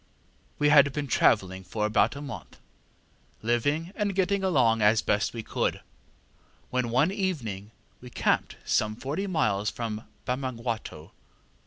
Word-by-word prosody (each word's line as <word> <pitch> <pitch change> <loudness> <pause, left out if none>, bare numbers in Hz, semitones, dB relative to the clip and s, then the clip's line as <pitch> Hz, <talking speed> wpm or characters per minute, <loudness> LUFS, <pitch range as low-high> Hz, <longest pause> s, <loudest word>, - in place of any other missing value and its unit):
ŌĆ£We 150 - +4
had 140 -2 +6
been 145 -1 -2
travelling 95 -7 +2
for 105 +3 -2
about 105 +3 +2
a 140 - -6
month, 140 -4 -8 0.9
living 145 +9 0
and 205 -3 -1
getting 195 +1 +1
along 125 -11 +3
as 105 +1 +4
best 105 +1 +1
we 115 -2 -6
could, - - -1 0.9
when 125 -2 0
one 135 +9 +3
evening 130 - -3 0.3
we 125 - -10
camped - - 0
some 110 0 +1
forty 150 - -3
miles 105 - +1
from 110 -2 -5 0.2
Bamangwato. 120 - -4
120 Hz, 135 wpm, -27 LUFS, 110-150 Hz, 0.9 s, had